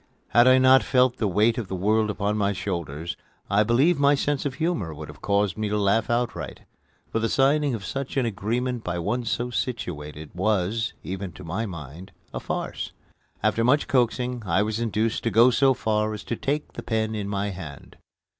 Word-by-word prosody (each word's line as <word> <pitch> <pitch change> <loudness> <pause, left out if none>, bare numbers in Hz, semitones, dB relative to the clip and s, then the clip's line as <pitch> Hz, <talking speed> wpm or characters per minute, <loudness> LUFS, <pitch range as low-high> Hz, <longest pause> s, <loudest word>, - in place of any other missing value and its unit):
Had 120 +1 +5
I 130 0 +7
not 130 0 +6
felt 125 -1 +2
the 110 - 0
weight 105 +5 +2
of 110 - -4
the 95 - -4
world 105 +2 +1
on 105 +1 +1
my 100 -1 +1
shoulders, 85 -4 -4 0.4
I 100 +1 +4
believe 135 +9 +3
my 140 0 +5
sense 145 0 0
of 135 - -6
humor 130 - -1
would 75 0 -8
have 75 - -12
caused 100 -1 +1
me 105 -1 -1
to 105 - 0
laugh 105 +2 +2
outright; 120 0 -2 0.5
for 115 - 0
the 115 0 0
signing 140 0 +2
of 100 -4 -7
such 135 +6 -4
an 130 - +2
agreement 115 +3 -2
by 90 0 -2
one 120 +8 -1
so 120 +3 -1
situated 80 - -4
was, 105 +3 0
even 95 0 -5
to 95 - -11
my 95 +7 -3
mind, 85 +1 -9 0.2
a - - -3
farce. - - -4 0.5
After 115 - +2
much 135 +5 +3
coaxing 125 -1 +1
I 95 +1 +2
was 110 +1 -2
induced 115 0 0
to - - +3
go 115 +3 +6
so 135 +2 +4
far 110 -2 0
as 105 - -8
to 120 - -3
take 145 +5 -2
the - - -6
pen 110 -1 -1
in 105 -2 -3
my 100 0 -1
hand. 80 -7 -9
110 Hz, 200 wpm, -25 LUFS, 95-125 Hz, 0.5 s, I